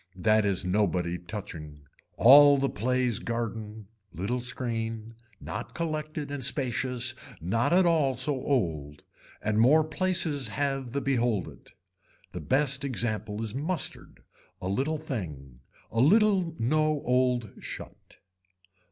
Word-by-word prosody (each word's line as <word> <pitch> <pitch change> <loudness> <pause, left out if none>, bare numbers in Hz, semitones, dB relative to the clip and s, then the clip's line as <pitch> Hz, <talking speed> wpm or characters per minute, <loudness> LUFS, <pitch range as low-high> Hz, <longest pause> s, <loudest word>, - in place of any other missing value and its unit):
That 110 +3 +2
is 95 -2 0
nobody 90 -3 0
touching. 80 -6 -8 0.4
All 145 +3 +8
the 135 0 0
plays 125 +1 0
garden. 110 -2 -5 0.3
Little 110 +9 -3
screen. 115 -2 -3 0.3
Not - - -7
collected 155 -3 -4
and 140 -2 -4
spacious 125 -1 0 0.3
not 105 - 0
at 180 +1 +5
all 155 -6 +2
so 130 +4 +1
old. 80 - -2 0.4
And 105 0 0
more 145 +7 +5
places 155 -4 +1
have 135 0 -2
the 140 - -1
behold 120 -7 0
it. - - -17 0.6
The - - -6
best 140 0 +1
example 110 -4 -2
is 110 -2 -4
mustard. 150 +4 -4 0.4
A 90 - -5
little 140 +10 -1
thing. 75 - -7 0.3
A 115 - -1
little 185 - +3
no 155 +4 +1
old 125 -3 +1
shut. - - -10
125 Hz, 125 wpm, -28 LUFS, 105-145 Hz, 0.6 s, All